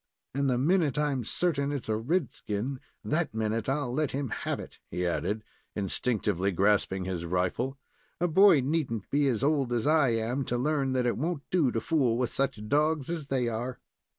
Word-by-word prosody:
"And 140 Hz, 0 st, +1 dB
the 125 Hz, -, +2 dB
minute 150 Hz, 0 st, +2 dB
I'm 145 Hz, -4 st, 0 dB
certain 140 Hz, +2 st, 0 dB
its 140 Hz, -4 st, -4 dB
a 110 Hz, -, +1 dB
red 135 Hz, +6 st, 0 dB
skin, 115 Hz, +6 st, -4 dB, 0.3 s
that 155 Hz, -5 st, 0 dB
minute 110 Hz, +1 st, -1 dB
I'll 135 Hz, -3 st, -1 dB
let 150 Hz, +1 st, +1 dB
him 135 Hz, -1 st, -2 dB
have -, -, -2 dB
it," -, -, -10 dB
he 90 Hz, -, -2 dB
added, 100 Hz, +5 st, -1 dB, 0.3 s
instinctively 100 Hz, -2 st, 0 dB
grasping 95 Hz, 0 st, +2 dB
his 90 Hz, -3 st, -3 dB
rifle. 90 Hz, +10 st, -1 dB, 0.4 s
"A 175 Hz, -, +2 dB
boy 175 Hz, -3 st, +6 dB
need 150 Hz, 0 st, 0 dB
n't 110 Hz, -4 st, -4 dB
be 145 Hz, 0 st, +3 dB
as 125 Hz, -2 st, 0 dB
old 140 Hz, -4 st, +2 dB
as 120 Hz, -2 st, 0 dB
I 155 Hz, -3 st, +4 dB
am 115 Hz, +4 st, 0 dB
to 120 Hz, -, -1 dB
learn 135 Hz, 0 st, 0 dB
that 125 Hz, -1 st, +1 dB
it 120 Hz, -, +1 dB
won't 160 Hz, 0 st, -2 dB
do 165 Hz, -8 st, +3 dB
to 115 Hz, -, 0 dB
fool 125 Hz, -3 st, +1 dB
with 125 Hz, -1 st, -1 dB
such 130 Hz, -6 st, -1 dB
dogs 150 Hz, +3 st, +1 dB
as 160 Hz, -5 st, -3 dB
they 130 Hz, -3 st, 0 dB
are." 120 Hz, +3 st, -3 dB
130 Hz, 195 wpm, -29 LUFS, 110-145 Hz, 0.4 s, boy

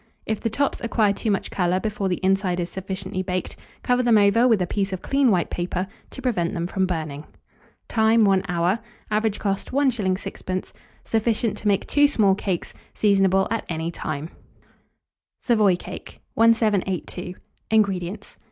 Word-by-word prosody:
If 220 Hz, -, -2 dB
the 230 Hz, -, -1 dB
tops 275 Hz, +6 st, -1 dB
acquire 220 Hz, -3 st, +2 dB
too 220 Hz, -, -3 dB
much 200 Hz, -, -1 dB
colour 180 Hz, 0 st, +1 dB
before 205 Hz, -2 st, -2 dB
the 180 Hz, -, -1 dB
inside 190 Hz, -1 st, +1 dB
is 175 Hz, 0 st, -3 dB
sufficiently 190 Hz, 0 st, -4 dB
baked, 185 Hz, -1 st, -3 dB, 0.3 s
cover 250 Hz, 0 st, +2 dB
them 240 Hz, -3 st, +4 dB
over 210 Hz, +4 st, +5 dB
with 225 Hz, -5 st, +4 dB
a 180 Hz, -, +1 dB
piece 195 Hz, +2 st, -2 dB
of 185 Hz, -, -5 dB
clean 275 Hz, -2 st, +3 dB
white 180 Hz, -5 st, +1 dB
paper, 180 Hz, +1 st, -2 dB, 0.2 s
to 265 Hz, -, -9 dB
prevent 180 Hz, -10 st, 0 dB
them 170 Hz, -, -2 dB
from 190 Hz, +1 st, 0 dB
burning. 155 Hz, -4 st, -4 dB, 0.6 s
Time. 220 Hz, 0 st, +4 dB
1 195 Hz, -1 st, +3 dB
hour. 180 Hz, +4 st, +1 dB, 0.3 s
Average 215 Hz, 0 st, +1 dB
cost, 195 Hz, -2 st, -2 dB
1s. 240 Hz, -9 st, +1 dB
6d. 185 Hz, -1 st, -5 dB, 0.3 s
Sufficient 225 Hz, 0 st, 0 dB
to 215 Hz, -, -4 dB
make 200 Hz, -1 st, +2 dB
2 290 Hz, 0 st, +4 dB
small 215 Hz, -9 st, +3 dB
cakes. 190 Hz, -3 st, -3 dB, 0.2 s
Seasonable 195 Hz, -2 st, +3 dB
at 230 Hz, -, -1 dB
any 165 Hz, 0 st, -2 dB
time. 155 Hz, -1 st, -5 dB, 1.1 s
SAVOY 215 Hz, -6 st, +3 dB
CAKE. -, -, -9 dB
1782. 200 Hz, -5 st, +1 dB, 0.3 s
INGREDIENTS. 200 Hz, -2 st, 0 dB
195 Hz, 160 wpm, -23 LUFS, 180-220 Hz, 1.1 s, over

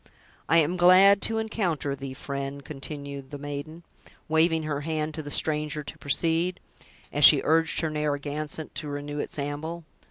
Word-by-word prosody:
"I 165 Hz, -, +5 dB
am 165 Hz, +3 st, +2 dB
glad 185 Hz, +3 st, +6 dB
to 225 Hz, -, +2 dB
encounter 185 Hz, -10 st, -2 dB
thee, 135 Hz, -1 st, -7 dB
friend," 140 Hz, 0 st, -6 dB
continued 140 Hz, -1 st, -6 dB
the 145 Hz, -, -7 dB
maiden, 145 Hz, +3 st, -7 dB, 0.4 s
waving 160 Hz, +1 st, +2 dB
her 150 Hz, -2 st, -3 dB
hand 155 Hz, 0 st, -2 dB
to 155 Hz, -, -5 dB
the 145 Hz, -, -8 dB
stranger 150 Hz, 0 st, -1 dB
to -, -, -8 dB
proceed, 165 Hz, +5 st, +1 dB, 0.5 s
as 145 Hz, -, 0 dB
she 140 Hz, 0 st, +10 dB
urged 160 Hz, +1 st, +2 dB
her 160 Hz, -, -1 dB
Narragansett 150 Hz, 0 st, -3 dB
to 155 Hz, -, -6 dB
renew 145 Hz, 0 st, -5 dB
its -, -, -4 dB
amble. 150 Hz, +4 st, -4 dB
150 Hz, 160 wpm, -26 LUFS, 145-165 Hz, 0.5 s, she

